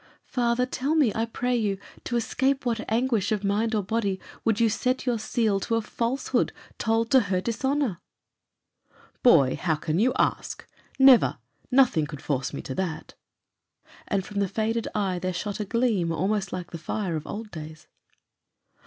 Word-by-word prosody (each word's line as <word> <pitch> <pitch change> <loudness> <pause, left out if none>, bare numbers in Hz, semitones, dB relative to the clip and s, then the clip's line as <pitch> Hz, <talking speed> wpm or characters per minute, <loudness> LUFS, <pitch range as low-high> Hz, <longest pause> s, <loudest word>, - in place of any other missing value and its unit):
"Father, 240 0 +1
tell 270 +4 -1
me, 275 -10 +3
I 225 - 0
pray 245 +2 -1
you, 210 -4 0 0.3
to 240 - -2
escape 265 +3 0
what 230 -2 -2
anguish 230 -3 +1
of 210 -2 0
mind 215 +3 +1
or 210 - +1
body 200 -2 -1 0.2
would 225 -1 +1
you 230 - +5
set 255 +4 0
your 240 -3 +1
seal 215 -2 +1
to 230 +4 -1
a 230 - +1
falsehood 235 +5 -1 0.3
told 225 +1 +1
to 265 - +7
her 190 -5 0
dishonour?" 240 -1 -1 1.2
"Boy, 145 - +5
how 165 -3 0
can 155 +2 -1
you 250 +4 +4
ask? - - -1 0.3
Never! 265 -3 +6 0.3
nothing 250 - +4
could 150 -3 -9
force 135 -3 -1
me - - -6
to 130 - -5
that." 165 -1 -4 0.9
And 195 -2 0
from 205 -1 -4
the 200 - +2
faded 225 +3 -1
eye 190 -4 0
there 185 +1 -2
shot 205 +3 -3
a 210 - -2
gleam 220 -6 +1
almost 190 +4 0
like 180 -1 -5
the 170 - -6
fire 175 +2 -2
of 155 - -5
old 215 +1 -6
days. 155 -1 -9
215 Hz, 170 wpm, -26 LUFS, 185-240 Hz, 1.2 s, to